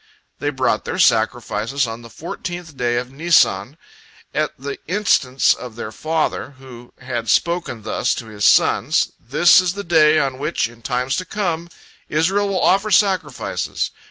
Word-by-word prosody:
They - - -1
brought - - 0
their - - -4
sacrifices 115 +3 +1
on 115 0 -6
the 115 - -12
fourteenth 170 +4 -7
day 120 -2 0
of 125 +1 -4
Nisan, 145 - +2 0.6
at - - 0
the 140 +2 -6
instance 155 -9 +2
of 125 -3 -9
their 110 -2 -6
father, 155 0 -2
who 125 -2 -13
had 120 -2 -4
spoken 170 -10 0
thus - - -1
to - - -6
his 105 -2 -7
sons: - - +3
"This 150 +10 +5
is 180 -1 -1
the 200 +1 -6
day 155 -3 +4
on 135 -3 0
which, 150 -3 -1
in 120 0 -17
times 125 +2 -1
to 185 - -3
come, 170 -5 -3 0.4
Israel 195 +6 +1
will 190 -2 -1
offer 195 +3 +3
sacrifices. 195 -3 0
140 Hz, 155 wpm, -20 LUFS, 120-175 Hz, 0.6 s, This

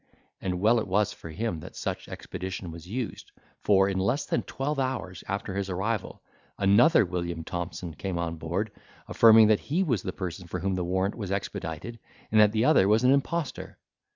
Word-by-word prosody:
And 90 -1 -2
well 110 +4 +4
it 110 - -3
was 105 +2 +1
for 85 - -10
him 90 0 -3
that - - -11
such - - -4
expedition 95 -1 -6
was 85 +1 -10
used; 120 +4 -5 0.3
for, 95 -1 +4
in 95 -1 -1
less 115 +10 0
than - - 0
twelve 140 +2 -3
hours 130 -9 -3
after 100 0 -3
his 100 0 -2
arrival, 95 +3 -3 0.3
another 105 +8 +5
William 85 -2 -3
Thompson 85 0 -5
came 90 +3 -4
on 85 -1 -3
board, 90 +7 -2 0.4
affirming 110 -1 +7
that 110 - +4
he 175 +7 +2
was 120 - 0
the 95 - -4
person 90 -1 -6
for 90 - -4
whom 95 +2 0
the 90 -1 -1
warrant 95 +3 0
was 100 -5 -5
expedited, 100 +2 -4 0.3
and 110 0 +6
that 105 -1 +6
the 110 +2 +1
other 135 -11 +5
was 110 +3 +3
an 125 - +5
impostor. 145 +2 -1
100 Hz, 190 wpm, -27 LUFS, 90-115 Hz, 0.4 s, affirming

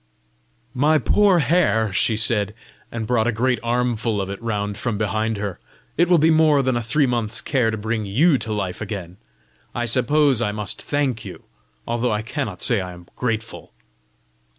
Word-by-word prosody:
"My 150 +4 +3
poor 195 - +3
hair!" 120 - +2
she 110 +3 +2
said, 105 -2 0 0.4
and 115 -1 -4
brought 115 0 +1
a - - +2
great 120 +2 0
armful 115 -2 -1
of 95 0 -3
it 100 - -7
round 105 -3 -2
from 115 0 -3
behind 110 +1 -1
her; 100 -3 -4 0.2
" - - -35
it 175 +2 +2
will 175 - +6
be 160 +1 +4
more 155 -3 +4
than 130 -1 +1
a 120 - 0
three 140 +6 +1
months' 115 -3 -1
care 125 -5 0
to 110 - -2
bring 110 0 -3
YOU 140 - +3
to 110 - -4
life 100 -3 -3
again! 95 -4 -6 0.6
I 120 - -1
suppose 130 +2 +2
I 105 -3 0
must 105 -2 -4
thank 135 -6 -1
you, - - -10 0.4
although 120 +1 -1
I 105 0 -1
cannot 115 -5 -3
say 115 -6 +3
I 90 -1 -6
am 90 0 -15
grateful!" 115 -3 -4
115 Hz, 185 wpm, -22 LUFS, 105-130 Hz, 0.6 s, will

